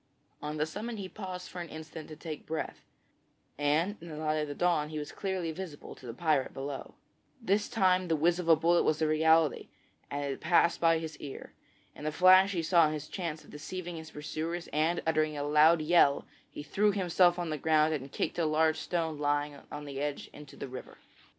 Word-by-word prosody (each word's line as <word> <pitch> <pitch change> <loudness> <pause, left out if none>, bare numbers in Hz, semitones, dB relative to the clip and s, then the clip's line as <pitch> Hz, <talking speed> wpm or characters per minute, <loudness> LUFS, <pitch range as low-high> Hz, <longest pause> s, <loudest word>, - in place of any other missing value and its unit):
On 150 +1 -4
the 150 - +1
summit 215 +8 -5
he 195 -2 -5
paused 185 -2 -7
for 180 - -7
an 170 - -7
instant 155 0 -9
to 155 - -9
take 155 0 -8
breath, 160 - -4 0.7
and 155 +8 +1
in 170 - -10
the 155 - -7
light 155 0 0
of 150 -1 -1
the 145 - -6
dawn 165 -3 +1
he 155 - -5
was 150 -1 -5
clearly 190 -4 -3
visible 160 -3 -8
to 130 - -13
the 115 - -5
pirate 155 -4 +1
below. 135 0 -6 0.4
This 205 -3 0
time 185 -3 +2
the 165 - +2
whiz 170 +3 +2
of 175 - -4
the 165 - +8
bullet 170 +2 +3
was 155 - +1
a - - +3
reality, 160 0 +3 0.4
and 145 0 -3
it 135 -1 -4
passed 170 -1 +3
by 165 -1 +5
his 160 -1 -6
ear. 140 -2 -9 0.4
In 150 - -7
a - - 0
flash 185 +4 +6
he 170 -3 -1
saw 165 -2 +5
his 155 -1 -5
chance 165 -5 -5
of - - -16
deceiving 175 +3 -6
his 160 0 -8
pursuers 160 +3 -4
and, 160 +3 +1
uttering 155 -1 +1
a 145 - -2
loud 155 +2 +5
yell, 155 -3 +4 0.2
he - - -8
threw 205 +7 +2
himself 180 -2 +3
on 175 -2 -3
the 155 - -3
ground 155 +1 +3
and 135 -2 -5
kicked - - -2
a 165 - +2
large 155 +1 +2
stone 165 -4 -2
lying 145 0 0 0.2
on 150 0 -6
the 140 -1 -5
edge 145 -1 -4
into 150 -1 -12
the - - -6
river. 130 0 -9
160 Hz, 215 wpm, -30 LUFS, 150-175 Hz, 0.7 s, the